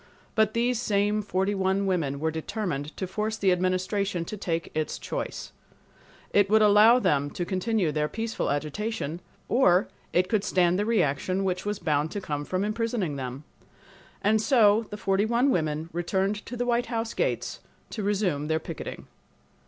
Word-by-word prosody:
But 220 Hz, 0 st, +2 dB
these 240 Hz, 0 st, +1 dB
same 210 Hz, -1 st, +1 dB
forty 195 Hz, 0 st, 0 dB
one 190 Hz, 0 st, +1 dB
women 160 Hz, -8 st, 0 dB
were 160 Hz, +1 st, 0 dB
determined 160 Hz, -3 st, -4 dB
to 190 Hz, -, -2 dB
force 215 Hz, +4 st, -2 dB
the 195 Hz, -3 st, +3 dB
Administration 185 Hz, 0 st, 0 dB
to 215 Hz, -, -5 dB
take 165 Hz, -5 st, -3 dB
its 155 Hz, -1 st, -2 dB
choice. -, -, -5 dB, 0.8 s
It 205 Hz, -1 st, +5 dB
could 215 Hz, +1 st, +5 dB
allow 210 Hz, +3 st, +7 dB
them 145 Hz, -, +1 dB
to 175 Hz, -, -4 dB
continue 190 Hz, -2 st, 0 dB
their 150 Hz, 0 st, 0 dB
peaceful 225 Hz, +7 st, -3 dB
agitation 160 Hz, +4 st, -3 dB, 0.3 s
or 190 Hz, -7 st, +4 dB, 0.2 s
it 180 Hz, +1 st, +2 dB
could 215 Hz, -2 st, +1 dB
stand 180 Hz, -2 st, +2 dB
the 205 Hz, -, 0 dB
reaction 185 Hz, -2 st, +1 dB
which 185 Hz, +1 st, -2 dB
was 210 Hz, 0 st, -1 dB
bound 150 Hz, -3 st, 0 dB
to 205 Hz, -, -2 dB
come 145 Hz, -6 st, -4 dB
from 185 Hz, +4 st, -1 dB
imprisoning 215 Hz, -6 st, -1 dB
them. 130 Hz, +1 st, -5 dB, 0.8 s
And 215 Hz, +1 st, +3 dB
so 220 Hz, -4 st, +4 dB
the 210 Hz, -, -6 dB
forty 195 Hz, 0 st, +1 dB
one 240 Hz, +4 st, +3 dB
women 155 Hz, -4 st, -1 dB
returned 190 Hz, +4 st, -1 dB
to 245 Hz, -, -6 dB
the 245 Hz, -, -1 dB
White 240 Hz, 0 st, +1 dB
House 230 Hz, -1 st, -2 dB
gates -, -, -1 dB, 0.3 s
to 220 Hz, -, -4 dB
resume' 195 Hz, -8 st, 0 dB
their 160 Hz, 0 st, +1 dB
picketing. 160 Hz, -, -7 dB
195 Hz, 170 wpm, -27 LUFS, 165-215 Hz, 0.8 s, allow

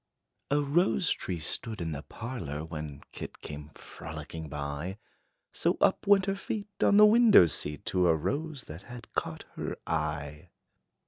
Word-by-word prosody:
A 145 Hz, +1 st, +3 dB
rose 165 Hz, +5 st, +2 dB
tree 90 Hz, -, -2 dB
stood 110 Hz, +8 st, -3 dB
in 85 Hz, -2 st, -2 dB
the 70 Hz, -2 st, -4 dB
parlor, 85 Hz, -, -5 dB
When 75 Hz, -3 st, -6 dB
kit -, -, -8 dB
came 75 Hz, 0 st, -7 dB
frolicking 80 Hz, -2 st, -8 dB
by; 75 Hz, +6 st, -4 dB, 0.6 s
So -, -, +1 dB
up -, -, +3 dB
went 200 Hz, -2 st, +6 dB
her 195 Hz, 0 st, 0 dB
feet 205 Hz, +1 st, -4 dB
on 200 Hz, -, +6 dB
the 210 Hz, -, +10 dB
window 220 Hz, -, +8 dB
seat, 75 Hz, -2 st, -2 dB
To 90 Hz, -1 st, +4 dB
a 80 Hz, -, +5 dB
rose, 145 Hz, -, -2 dB
that 80 Hz, -1 st, -9 dB
had 120 Hz, -1 st, -10 dB
caught -, -, -2 dB
her -, -, -3 dB
eye. 75 Hz, 0 st, -3 dB
90 Hz, 155 wpm, -30 LUFS, -, 0.6 s, the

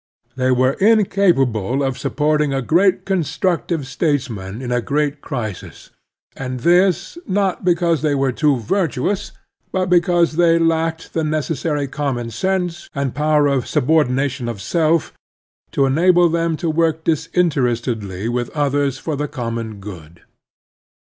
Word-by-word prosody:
They 130 Hz, 0 st, 0 dB
were 130 Hz, +1 st, +3 dB
in 215 Hz, 0 st, +5 dB
capable 135 Hz, -, +1 dB
of 135 Hz, -1 st, -1 dB
supporting 150 Hz, -1 st, 0 dB
a 135 Hz, -, -1 dB
great 185 Hz, +8 st, +2 dB
constructive 175 Hz, -3 st, -1 dB
states 145 Hz, -1 st, -1 dB
man 100 Hz, 0 st, -7 dB
in 125 Hz, -1 st, -5 dB
a 120 Hz, 0 st, +1 dB
great 145 Hz, +2 st, -1 dB
crisis; 110 Hz, -, -6 dB, 0.4 s
and 130 Hz, -2 st, -5 dB
this, 180 Hz, -, +2 dB
not 195 Hz, -1 st, 0 dB
because 170 Hz, -3 st, +2 dB
they 150 Hz, -2 st, +1 dB
were 135 Hz, -1 st, +1 dB
too 145 Hz, +2 st, +2 dB
\ 115 Hz, -4 st, -7 dB
irtuous, 190 Hz, +1 st, -1 dB, 0.4 s
but 185 Hz, -1 st, -1 dB
because 175 Hz, -2 st, +3 dB
they 170 Hz, -1 st, +4 dB
lacked 165 Hz, 0 st, 0 dB
the 160 Hz, -, 0 dB
necessary 155 Hz, -1 st, -1 dB
common 130 Hz, -4 st, -3 dB
sense 180 Hz, -, -2 dB
and 140 Hz, -2 st, -2 dB
power 150 Hz, +1 st, +2 dB
of 140 Hz, -3 st, +1 dB
subordina 135 Hz, -1 st, +2 dB
tion 130 Hz, -3 st, -5 dB
of 115 Hz, -4 st, -5 dB
self 160 Hz, -, +1 dB, 0.6 s
to 140 Hz, -, +2 dB
enable 175 Hz, +5 st, +4 dB
them 165 Hz, -1 st, 0 dB
to 170 Hz, 0 st, -2 dB
work 160 Hz, 0 st, 0 dB
disinterestedly 125 Hz, -, -1 dB
with 120 Hz, 0 st, -2 dB
others 145 Hz, -2 st, +1 dB
for 155 Hz, +2 st, -4 dB
the 150 Hz, +1 st, -2 dB
common 115 Hz, -5 st, -4 dB
good. 85 Hz, -4 st, -11 dB
150 Hz, 145 wpm, -19 LUFS, 130-170 Hz, 0.6 s, in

